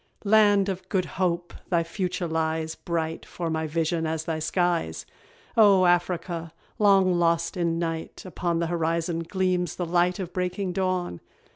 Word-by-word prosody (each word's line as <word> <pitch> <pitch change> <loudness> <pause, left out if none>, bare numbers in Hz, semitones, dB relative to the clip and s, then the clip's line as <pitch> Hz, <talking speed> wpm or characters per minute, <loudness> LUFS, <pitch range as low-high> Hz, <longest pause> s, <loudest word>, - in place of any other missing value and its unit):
Land 205 -1 +5
of 185 -1 -4
"Good 185 -2 +1 0.2
Hope!" 175 -1 0 0.2
thy 170 -2 +2
future 180 +1 -3
lies 160 0 -1
Bright 165 -1 -3
'fore 170 -2 -4
my 160 0 -1
vision 165 +1 0
as 160 0 -2
thy 160 -1 -2
skies! 175 +2 0 0.5
O 200 -5 +6
Africa! 175 -1 0 0.3
long 195 -4 +4
lost 170 -1 +1
in 170 -2 0
night, 165 -1 -4
Upon 175 -2 -2
the 170 - 0
horizon 165 0 -1
gleams 180 0 -1
the 180 - -2
light 175 +2 +2
Of 180 -3 -5
breaking 180 +1 -2
dawn. 185 - -1
175 Hz, 150 wpm, -26 LUFS, 165-185 Hz, 0.5 s, O